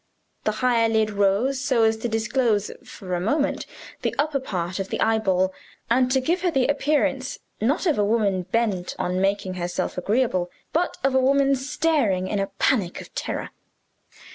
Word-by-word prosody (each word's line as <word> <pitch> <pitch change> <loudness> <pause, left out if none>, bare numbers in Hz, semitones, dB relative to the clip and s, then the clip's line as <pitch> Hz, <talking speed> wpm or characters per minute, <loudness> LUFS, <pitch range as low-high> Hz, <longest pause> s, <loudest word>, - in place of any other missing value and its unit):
The 215 - +1
higher 230 -2 +3
lid 220 -1 +2
rose 205 +7 +1
so 260 -5 +2
as 220 0 +4
to 225 - -3
disclose, 220 -1 +1
for 200 -7 -8
a 175 - 0
moment, 280 - 0 0.3
the - - -1
upper 290 -1 +1
part 185 -6 -3
of 195 - -3
the - - -3
eyeball, 190 -4 +2 0.4
and 255 +1 +3
to 265 - +3
give 340 +8 0
her 360 - +2
the 270 -6 +2
appearance 285 -2 0 0.2
not 275 - +1
of 315 - +2
a - - +4
woman 205 -3 +1
bent 210 -6 0
on 180 +1 -1
making 195 -1 0
herself 175 0 -3
agreeable, 200 -3 +1 0.2
but 345 +3 0
of 270 0 +2
a 265 - +4
woman 275 +1 +3
staring 270 - 0
in 205 - -1
a 195 - 0
panic 200 -8 0
of - - -11
terror. - - -4
225 Hz, 175 wpm, -24 LUFS, 195-270 Hz, 0.4 s, as